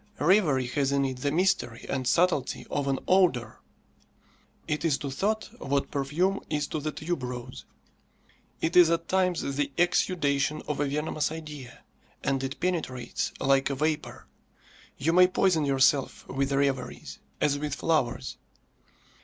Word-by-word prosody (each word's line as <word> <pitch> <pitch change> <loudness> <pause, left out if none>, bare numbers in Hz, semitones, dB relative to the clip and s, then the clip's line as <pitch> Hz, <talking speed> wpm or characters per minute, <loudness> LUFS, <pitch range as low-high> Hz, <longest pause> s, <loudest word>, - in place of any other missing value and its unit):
Reverie 150 -6 +3
has 135 +2 0
in 140 -1 +2
it 130 -1 -3
the 140 +3 -1
mystery 175 -8 0
and 130 -2 -2
subtlety 175 -2 +1
of 145 -1 -1
an 135 -1 +1
odour. 170 - +2 1.1
It 150 0 -2
is 155 -5 +2
to 140 - -5
thought 215 +11 -1
what 140 0 -1
perfume 160 +8 0
is 150 -1 0
to 155 - -2
the 155 +1 -3
tuberose. 125 - -5 1.0
It 165 - -1
is 175 -2 +8
at 165 0 0
times 185 -2 +1 0.2
the 145 -1 0
exudation 155 -4 +1
of 150 - -2
a 145 - +2
venomous 150 +2 -1
idea, 150 -6 -9 0.4
and 135 -1 0
it 135 +1 -4
penetrates 160 -9 -2
like 135 0 +2
a 140 - -2
vapour. 155 +2 -2 0.7
You 160 +5 +1
may 180 +1 +7
poison 180 -4 +2
yourself 135 0 +2
with 135 +1 -1
reveries, 135 -1 -1 0.2
as 145 -1 +1
with 145 -1 -3
flowers. 155 -8 -1
145 Hz, 145 wpm, -27 LUFS, 135-165 Hz, 1.1 s, is